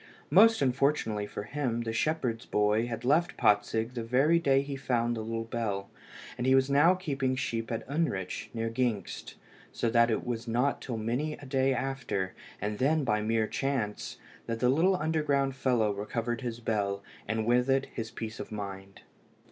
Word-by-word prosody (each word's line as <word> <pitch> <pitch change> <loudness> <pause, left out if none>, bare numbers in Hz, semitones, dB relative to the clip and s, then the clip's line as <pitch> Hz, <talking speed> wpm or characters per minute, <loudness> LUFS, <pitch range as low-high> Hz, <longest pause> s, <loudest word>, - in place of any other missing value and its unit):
Most 225 -7 +6
unfortunately 125 -6 +1
for 105 - -6
him, 120 -1 -2
the 115 -1 -3
shepherd's 125 -3 -1
boy 105 +2 +2
had 115 0 -5
left 160 +6 +2
Patzig 110 +3 +2
the 120 -2 -3
very 135 +8 +3
day 135 -4 +3
he 140 0 -5
found 120 -3 0
the 110 - -3
little 115 +1 -3
bell, 110 -4 -3 0.5
and 125 - 0
he 130 - +6
was 135 +1 +3
now 155 +6 +5
keeping 135 -8 -1
sheep 115 -2 -2
at 115 - -3
Unrich, 140 - -2
near 115 -1 -2
Gingst, 115 -3 -2 0.4
so 115 - -1
that 115 0 +5
it 110 - -1
was 120 -1 -3
not 125 +5 +1
till 120 -3 -4
many 125 +8 -1
a 145 - -10
day 135 0 +2
after, 130 -8 -2 0.3
and 105 +1 -3
then 150 +3 +2
by 105 -4 +1
mere 110 +1 +1
chance, 120 -4 -2 0.3
that 115 0 -2
the 125 - +3
little 170 +8 +4
underground 150 -4 0
fellow 120 -6 +2
recovered 115 +4 -3
his 120 -2 -4
bell, 100 -3 -1 0.2
and 110 +1 -1
with 125 +2 +3
it 135 0 +3
his 110 -1 -4
peace 110 -1 -6
of - - -7
mind. 100 -2 -7
120 Hz, 180 wpm, -29 LUFS, 110-135 Hz, 0.5 s, Most